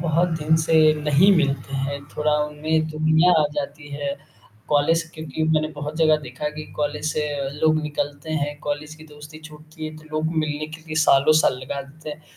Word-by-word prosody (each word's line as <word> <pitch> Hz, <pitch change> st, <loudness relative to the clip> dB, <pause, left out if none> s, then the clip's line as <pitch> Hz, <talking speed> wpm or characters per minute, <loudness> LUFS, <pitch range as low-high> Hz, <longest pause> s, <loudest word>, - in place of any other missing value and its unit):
बहुत 170 Hz, +2 st, +2 dB
दिन 155 Hz, +1 st, +2 dB
से 160 Hz, -1 st, +4 dB
नहीं 155 Hz, +7 st, +5 dB
मिलते 140 Hz, -3 st, 0 dB
हैं। 140 Hz, +1 st, -2 dB, 0.2 s
थोड़ा 150 Hz, 0 st, +2 dB
उनमें 155 Hz, +1 st, -1 dB
दूरियाँ 155 Hz, +3 st, +3 dB
आ -, -, +2 dB
जाती 145 Hz, +1 st, -5 dB
है, 140 Hz, 0 st, -3 dB, 0.5 s
कॉलेज 155 Hz, +3 st, +3 dB
क्योंकि 155 Hz, -1 st, -5 dB
मैंने 155 Hz, -1 st, +2 dB
बहुत 150 Hz, +1 st, -5 dB
जगह 155 Hz, -1 st, +4 dB
देखा 130 Hz, +4 st, -4 dB
कि 155 Hz, 0 st, -8 dB
कॉलेज 150 Hz, +1 st, -1 dB
से 150 Hz, -1 st, -1 dB
अ, 135 Hz, -, -2 dB
लोग 155 Hz, 0 st, +3 dB
निकलते 145 Hz, 0 st, -4 dB
हैं 145 Hz, -1 st, -2 dB
कॉलेज 150 Hz, +1 st, -4 dB
की 155 Hz, 0 st, -14 dB
दोस्ती 150 Hz, 0 st, -12 dB
छूटती 155 Hz, +1 st, -11 dB
है, 155 Hz, 0 st, -8 dB
तो 155 Hz, -, -14 dB
लोग 160 Hz, +1 st, -1 dB
मिलने 155 Hz, -1 st, -1 dB
के 155 Hz, +1 st, -10 dB
लिए 155 Hz, -, -5 dB
सालों-साल 140 Hz, -1 st, +4 dB
लगा 140 Hz, +2 st, -4 dB
देते 150 Hz, +3 st, -10 dB
हैं। 150 Hz, +1 st, -9 dB
155 Hz, 190 wpm, -23 LUFS, 145-155 Hz, 0.5 s, नहीं